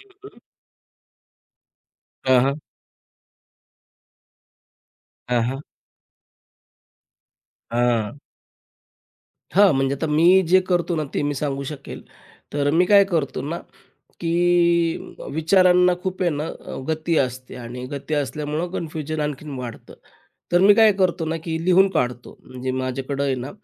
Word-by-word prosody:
हं, 400 Hz, 0 st, -16 dB
हं. -, -, -21 dB, 1.9 s
हां, 130 Hz, -1 st, +5 dB
हां. 140 Hz, +3 st, -1 dB, 2.7 s
अ 125 Hz, -1 st, +2 dB
हां. 135 Hz, +3 st, -5 dB, 2.1 s
हां. 120 Hz, +1 st, 0 dB, 1.3 s
हां 200 Hz, -1 st, +5 dB
म्हणजे 135 Hz, 0 st, +1 dB
आता 150 Hz, +4 st, -3 dB
मी 170 Hz, +5 st, +5 dB
जे 185 Hz, +2 st, +6 dB
करतो 175 Hz, -1 st, +1 dB
ना, 155 Hz, -, -1 dB
ते -, -, 0 dB
मी 145 Hz, 0 st, -1 dB
सांगू 140 Hz, 0 st, -3 dB
शकेल. 140 Hz, -2 st, -9 dB, 0.5 s
तर 145 Hz, 0 st, +1 dB
मी 165 Hz, +4 st, +3 dB
काय 200 Hz, +1 st, +6 dB
करतो 160 Hz, -7 st, -1 dB
ना 165 Hz, +4 st, -4 dB, 0.6 s
की 170 Hz, 0 st, +1 dB, 0.2 s
विचारांना 180 Hz, +2 st, +4 dB
खूप 185 Hz, -1 st, -3 dB
आहे 175 Hz, -, +2 dB
ना, 150 Hz, +1 st, -3 dB, 0.4 s
गती 160 Hz, +1 st, -1 dB
असते 130 Hz, -1 st, -3 dB
आणि 125 Hz, +1 st, -7 dB
गती 140 Hz, +2 st, -4 dB
असल्यामुळे 150 Hz, +4 st, -2 dB
कन्फ्युजन 155 Hz, -3 st, -4 dB
आणखीन 150 Hz, 0 st, -4 dB
वाढतं. 120 Hz, -2 st, -8 dB, 0.6 s
तर 175 Hz, -, +5 dB
मी 200 Hz, +2 st, +7 dB
काय 220 Hz, 0 st, +6 dB
करतो 185 Hz, -4 st, 0 dB
ना 160 Hz, +1 st, -2 dB
की 160 Hz, -1 st, -3 dB
लिहून 185 Hz, +2 st, +5 dB
काढतो, 125 Hz, -, -3 dB
म्हणजे 130 Hz, 0 st, -5 dB
माझ्याकडं 130 Hz, +2 st, -3 dB
आहे 135 Hz, -1 st, +1 dB
ना, 130 Hz, +2 st, -6 dB
155 Hz, 120 wpm, -22 LUFS, 135-175 Hz, 2.7 s, मी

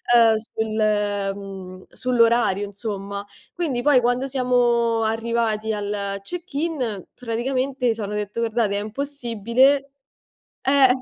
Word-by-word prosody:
ehm, 230 Hz, -2 st, +6 dB
sul 220 Hz, 0 st, -3 dB
ehm, 195 Hz, -3 st, -2 dB
sull'orario, 235 Hz, -5 st, +2 dB
insomma. 200 Hz, -1 st, -5 dB, 0.3 s
Quindi 295 Hz, -9 st, -1 dB
poi 285 Hz, -3 st, +6 dB
quando 245 Hz, +2 st, +1 dB
siamo 240 Hz, -3 st, +2 dB
arrivati 225 Hz, -1 st, 0 dB
al 200 Hz, -1 st, -3 dB
check-in, 285 Hz, -, -3 dB
praticamente 255 Hz, +1 st, -1 dB
c'hanno 210 Hz, -2 st, -5 dB
detto: 210 Hz, +2 st, -3 dB
"Guardate 225 Hz, -3 st, +1 dB
è -, -, -1 dB
impossibile". 265 Hz, +2 st, +1 dB, 0.7 s
Eh, 270 Hz, -1 st, +5 dB
230 Hz, 105 wpm, -23 LUFS, 205-255 Hz, 0.7 s, ehm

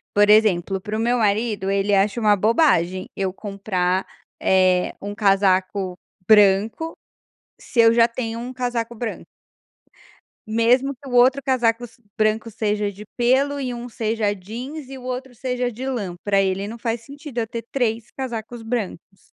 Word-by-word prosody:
Por 205 Hz, 0 st, +5 dB
exemplo 195 Hz, -3 st, +4 dB
para 210 Hz, +2 st, -4 dB
o -, -, -2 dB
meu 240 Hz, +2 st, +2 dB
marido 210 Hz, -2 st, 0 dB
ele 200 Hz, +1 st, +1 dB
acha 200 Hz, +4 st, +2 dB
uma 210 Hz, -2 st, +4 dB
bobagem 185 Hz, -, +2 dB
eu 190 Hz, -1 st, -1 dB
comprar, 190 Hz, -2 st, -1 dB, 0.4 s
eh, 185 Hz, -1 st, +3 dB
um 205 Hz, +1 st, -5 dB
casaco 195 Hz, -2 st, +1 dB, 0.3 s
branco 215 Hz, +9 st, +4 dB, 0.7 s
se 235 Hz, -, 0 dB
eu 230 Hz, 0 st, +7 dB
já 230 Hz, 0 st, +5 dB
tenho 230 Hz, -1 st, -4 dB
um 245 Hz, +2 st, -6 dB
casaco 240 Hz, -2 st, -3 dB
branco 230 Hz, 0 st, -5 dB, 1.2 s
mesmo 240 Hz, +5 st, +2 dB
que 275 Hz, +1 st, -12 dB
o -, -, -7 dB
outro 255 Hz, +3 st, +5 dB
casaco 240 Hz, -3 st, +1 dB
se 235 Hz, -, -24 dB, 0.2 s
branco 220 Hz, +1 st, 0 dB
seja 210 Hz, -1 st, -1 dB
de 200 Hz, +1 st, -11 dB
pêlo 265 Hz, +4 st, +2 dB
e 255 Hz, -2 st, -3 dB
um 240 Hz, +1 st, -7 dB
seja 220 Hz, -2 st, -1 dB
jeans 240 Hz, -, -7 dB
e 270 Hz, -, -8 dB
o -, -, -11 dB
outro 255 Hz, 0 st, -5 dB
seja 250 Hz, 0 st, -2 dB
de 250 Hz, +4 st, -6 dB
lã, 205 Hz, -9 st, -3 dB
pra 200 Hz, -1 st, +2 dB
ele 195 Hz, +1 st, 0 dB
não 225 Hz, +2 st, -7 dB
faz 230 Hz, 0 st, -2 dB
sentido 280 Hz, 0 st, -7 dB
eu 225 Hz, -, -1 dB
ter 230 Hz, +1 st, -6 dB
3 230 Hz, -3 st, -1 dB
casacos 240 Hz, -2 st, -6 dB
brancos. 210 Hz, -4 st, -5 dB
225 Hz, 165 wpm, -22 LUFS, 200-245 Hz, 1.2 s, eu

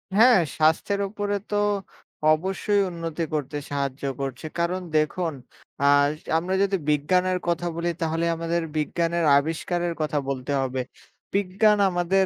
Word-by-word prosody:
হ্যাঁ 235 Hz, -1 st, +7 dB, 0.2 s
স্বাস্থ্যের 160 Hz, +6 st, +2 dB
উপরে 205 Hz, 0 st, -2 dB, 0.2 s
তো -, -, 0 dB, 0.8 s
অবশ্যই 190 Hz, +5 st, 0 dB
উন্নতি 165 Hz, -1 st, -4 dB
করতে 150 Hz, -1 st, -2 dB
সাহায্য 140 Hz, -1 st, -3 dB, 0.2 s
করছে। 135 Hz, +1 st, -4 dB
কারণ 180 Hz, +2 st, 0 dB, 0.2 s
দেখুন 160 Hz, +2 st, 0 dB, 0.5 s
আ -, -, +3 dB, 0.5 s
আমরা 180 Hz, +3 st, -2 dB
যদি 195 Hz, -1 st, +1 dB
বিজ্ঞানের 180 Hz, +5 st, +2 dB
কথা 175 Hz, 0 st, 0 dB
বলি, 170 Hz, +1 st, -1 dB
তাহলে 165 Hz, +1 st, 0 dB
আমাদের 165 Hz, +1 st, -1 dB, 0.2 s
বিজ্ঞানের 170 Hz, +2 st, 0 dB
আবিষ্কারের 170 Hz, +3 st, -1 dB
কথা 150 Hz, -1 st, -1 dB
বলতে 135 Hz, +1 st, -3 dB
হবে। 130 Hz, -1 st, -2 dB, 0.5 s
বিজ্ঞান 205 Hz, +2 st, +3 dB
আমাদের 185 Hz, +2 st, +2 dB
170 Hz, 125 wpm, -25 LUFS, 155-185 Hz, 0.8 s, হ্যাঁ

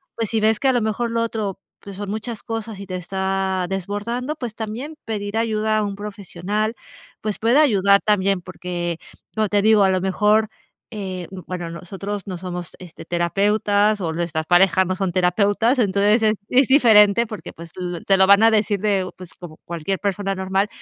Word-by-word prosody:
Pues, 225 Hz, -3 st, -2 dB
si 225 Hz, -, 0 dB
ves 220 Hz, 0 st, +2 dB
que 275 Hz, -, +1 dB
a 260 Hz, -, +4 dB
lo 240 Hz, -, +1 dB
mejor 220 Hz, +2 st, -1 dB
lo 230 Hz, 0 st, 0 dB
otro, 215 Hz, -4 st, -3 dB, 0.2 s
pues, 200 Hz, -1 st, -10 dB
son 200 Hz, 0 st, -6 dB
muchas 220 Hz, +1 st, -4 dB
cosas, 225 Hz, -2 st, -5 dB
y 200 Hz, -, -8 dB
te 185 Hz, -, -5 dB
está 190 Hz, 0 st, -2 dB
desbordando, 205 Hz, -, -3 dB
pues, 240 Hz, -6 st, -6 dB
también 235 Hz, +8 st, -6 dB
pedir 210 Hz, -1 st, -3 dB
ayuda 220 Hz, -1 st, 0 dB
a 215 Hz, -, +1 dB
un 200 Hz, -1 st, -3 dB
profesional, 205 Hz, +1 st, -4 dB, 0.5 s
pues 210 Hz, -1 st, -3 dB
puede 235 Hz, +6 st, +3 dB
ayudar 200 Hz, -8 st, +4 dB
también, 195 Hz, -2 st, +1 dB
porque, 175 Hz, -2 st, -4 dB, 0.4 s
como 215 Hz, -1 st, +1 dB
te 205 Hz, 0 st, +1 dB
digo, 215 Hz, -1 st, +5 dB
a 190 Hz, -, +4 dB
lo 185 Hz, -1 st, 0 dB
mejor, 210 Hz, +3 st, +2 dB, 0.4 s
eh, 185 Hz, -4 st, -5 dB, 0.2 s
bueno, 175 Hz, -2 st, -5 dB
nosotros 195 Hz, +4 st, -6 dB
no 185 Hz, -2 st, -4 dB
somos, 175 Hz, -1 st, -6 dB
este, 175 Hz, -3 st, -12 dB
terapeutas, 205 Hz, +4 st, +1 dB
o 165 Hz, -3 st, -1 dB
nuestras 160 Hz, -1 st, -2 dB
parejas 185 Hz, +1 st, +4 dB
no 185 Hz, +1 st, -2 dB
son 190 Hz, -3 st, -1 dB
terapeutas. 205 Hz, +7 st, +2 dB
Entonces 205 Hz, +2 st, +3 dB
es 215 Hz, 0 st, +3 dB
es 260 Hz, 0 st, +4 dB
diferente, 230 Hz, -5 st, +5 dB
porque, 205 Hz, -6 st, -8 dB
pues, 165 Hz, 0 st, -11 dB
l 180 Hz, -2 st, -4 dB
te 195 Hz, -1 st, +4 dB
lo 190 Hz, -, +5 dB
van 200 Hz, +2 st, +6 dB
a 225 Hz, -, +6 dB
decir 210 Hz, -2 st, +1 dB
de, 195 Hz, -3 st, 0 dB
pues, 180 Hz, -2 st, -11 dB
como 170 Hz, -3 st, -11 dB
cualquier 170 Hz, +3 st, -3 dB
persona 195 Hz, -1 st, -2 dB
normal, 190 Hz, +2 st, 0 dB
200 Hz, 190 wpm, -21 LUFS, 185-215 Hz, 0.5 s, van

